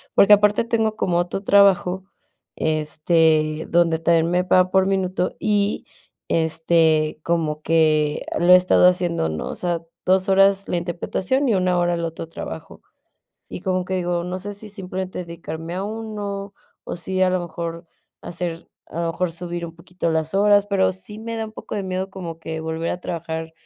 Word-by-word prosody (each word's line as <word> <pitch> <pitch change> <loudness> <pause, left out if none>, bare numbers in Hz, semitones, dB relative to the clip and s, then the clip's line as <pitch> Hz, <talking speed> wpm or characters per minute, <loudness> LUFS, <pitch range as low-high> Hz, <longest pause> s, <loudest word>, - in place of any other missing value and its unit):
Porque 200 +1 +7
aparte 210 +1 +4
tengo 225 -2 0
como 180 -5 0
otro 175 +3 -2
trabajo, 195 -2 +4 0.5
este, 155 0 +1
donde 170 -1 +3
también 165 0 +2
me 180 +1 +2
paga 185 0 +3
por 190 0 +4
minuto, 185 -1 -1
y, 205 -1 0 0.4
este, 160 -1 +2
como 160 -3 -1
que 155 -2 +2
lo 175 +1 +6
he - - +11
estado 180 0 +4
haciendo, 175 - +1
¿no? 80 0 -4
O - - -5
sea, 175 -2 -2 0.2
2 185 +1 +3
horas 195 0 +4
la - - -1
interpretación 185 - -1
y 220 - +3
1 180 -1 +1
hora 175 0 +1
el 170 - -3
otro 165 0 -6
trabajo. 80 - -8 0.7
Y - - -7
como 185 -1 0
que 190 - -2
digo, 175 -1 -1
no 180 +1 -4
sé 205 +2 -6
si 205 +2 -10
simplemente 190 -2 -5
dedicarme 165 -1 -7
a 190 +2 -3
uno, 205 -2 -5 0.3
o - - -5
si 185 +2 -1
a 185 - +4
lo 185 0 0
mejor 170 0 -6 0.4
hacer 170 -1 -5 0.2
a 170 - -6
lo 165 0 -1
mejor 175 0 -2
subir 175 0 -5
un 165 - -11
poquito 170 +1 -4
las 160 +1 -1
horas, 205 0 +4
pero 195 -2 +2
sí 185 +3 -8
me 230 +1 -5
da 225 0 -3
un 215 - -12
poco - - -8
de 200 - -2
miedo 190 0 -3
como 175 -4 -7
que 160 0 -5
volver 160 +1 -3
a 180 - -4
trabajar 160 -1 -5
180 Hz, 185 wpm, -22 LUFS, 165-195 Hz, 0.7 s, he